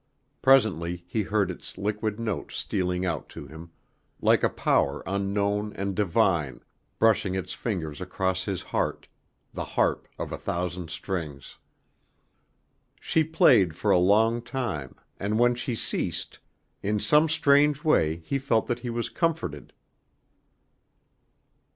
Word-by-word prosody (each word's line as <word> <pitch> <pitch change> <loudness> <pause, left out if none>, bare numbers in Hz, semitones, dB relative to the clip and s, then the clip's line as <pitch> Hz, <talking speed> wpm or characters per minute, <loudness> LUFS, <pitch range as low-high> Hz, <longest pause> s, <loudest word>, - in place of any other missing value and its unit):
Presently 90 - +3
he 110 - -1
heard 100 -2 0
its - - -10
liquid 105 +1 -2
notes 110 -5 -3
stealing 90 0 -1
out 85 -5 -3
to - - -9
him, 80 +3 -11 0.5
like - - +4
a - - +3
power 70 +1 +1
unknown 100 +2 -1
and 100 0 -3
divine, 90 -7 +1 0.4
brushing 110 -4 +3
its 95 - -3
fingers 80 -10 -4
across 95 0 -1
his 95 -4 -3
heart, - - -2 0.5
the - - -3
harp - - 0
of - - -5
a - - -5
thousand 90 -1 -3
strings. 80 -7 -5 1.4
She 160 - +1
played 120 - +4
for 105 +4 0
a 90 - +5
long 110 +6 +3
time, 115 - -4 0.2
and 105 +2 -1
when 120 +1 +4
she 120 0 -3
ceased, - - -2 0.4
in 105 +1 0
some 150 +7 +4
strange 145 -1 +3
way 80 - +2
he 140 - -1
felt 115 -5 +1
that 120 0 -2
he 120 0 -5
was 120 0 -2
comforted. 160 - -2
100 Hz, 130 wpm, -26 LUFS, 90-115 Hz, 1.4 s, a